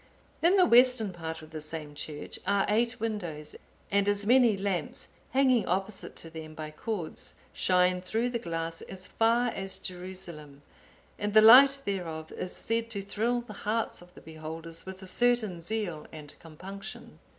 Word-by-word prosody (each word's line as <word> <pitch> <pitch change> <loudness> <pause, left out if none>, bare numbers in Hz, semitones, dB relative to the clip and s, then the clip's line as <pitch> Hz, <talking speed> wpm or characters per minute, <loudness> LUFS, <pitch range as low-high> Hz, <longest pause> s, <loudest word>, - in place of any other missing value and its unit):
In 345 +4 +5
the 370 -2 +6
western 245 - +5
part 160 -1 -6
of 155 - -13
the 155 -1 -5
same 155 -1 -5
church 150 0 -6
are 200 -1 +3
eight 235 +3 +1
windows; 175 -9 -4 0.4
and 200 0 +3
as 205 0 0
many 240 -2 +5
lamps, 190 -5 -2 0.2
hanging 260 -3 +3
opposite 195 +3 -2
to 165 - -10
them 160 -1 -8
by 155 -1 -6
cords, 175 +1 -4 0.2
shine 180 0 +3
through 225 +6 -1
the 235 - -1
glass 165 -4 -3
as 185 -1 -7
far 235 +2 +2
as 195 -3 -1
Jerusalem; 180 -6 -8 0.6
and 205 +1 -2
the 215 - +9
light 270 +5 +9
thereof 165 -5 -4
is 185 - -5
said 230 0 -1
to 200 -3 -4
thrill 230 +5 0
the 235 -3 -10
hearts 215 +1 -2
of 175 0 -17
the - - -13
beholders 160 +2 -8
with 190 0 -8
a - - -9
certain 220 -4 +1
zeal 175 -4 -3
and 150 -2 -10
compunction. 185 +5 -10
190 Hz, 165 wpm, -29 LUFS, 165-225 Hz, 0.6 s, the